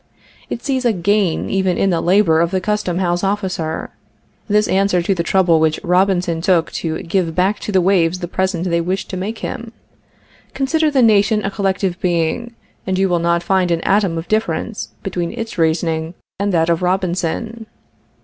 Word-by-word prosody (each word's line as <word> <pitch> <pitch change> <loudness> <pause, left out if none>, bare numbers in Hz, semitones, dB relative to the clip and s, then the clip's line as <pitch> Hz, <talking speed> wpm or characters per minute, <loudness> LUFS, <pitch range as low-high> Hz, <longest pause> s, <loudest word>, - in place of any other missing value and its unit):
It 235 - -5
sees 265 -2 -1
a 240 -2 +2
gain 195 -1 +1
even 190 -2 +1
in 195 - +2
the 170 - 0
labor 175 -3 +3
of 170 - +2
the 190 +1 0
custom 185 -2 -1
house 175 -1 0
officer. 190 -5 -2 0.6
This 210 0 +2
answers 190 -3 +1
to 195 - +2
the 175 - -1
trouble 170 -1 +3
which 155 -1 +1
Robinson 180 -2 +1
took 170 -2 +2
to 160 -1 -3
give 170 -2 -1
back 190 +3 +1
to - - -5
the 190 -2 +3
waves 175 -2 +2
the 175 -1 -5
present 185 0 -1
they 170 -1 +1
wished 185 +3 -3
to - - -4
make 210 +5 -4
him. 230 0 -6 0.8
Consider 310 +3 +1
the 270 -4 +3
nation 215 -1 +3
a 200 - -1
collective 190 -2 -1
being, 175 +7 -1 0.3
and 190 -1 0
you 190 0 +2
will 175 -1 +1
not 170 0 +1
find 185 0 +1
an 170 -1 0
atom 195 -4 +1
of 165 - -5
difference 220 0 -2
between 175 -3 -3
its 225 -5 -6
reasoning 160 +1 0 0.2
and 200 0 0
that 165 -1 +2
of 165 - 0
Robinson. 185 +5 -2
185 Hz, 185 wpm, -18 LUFS, 170-205 Hz, 0.8 s, labor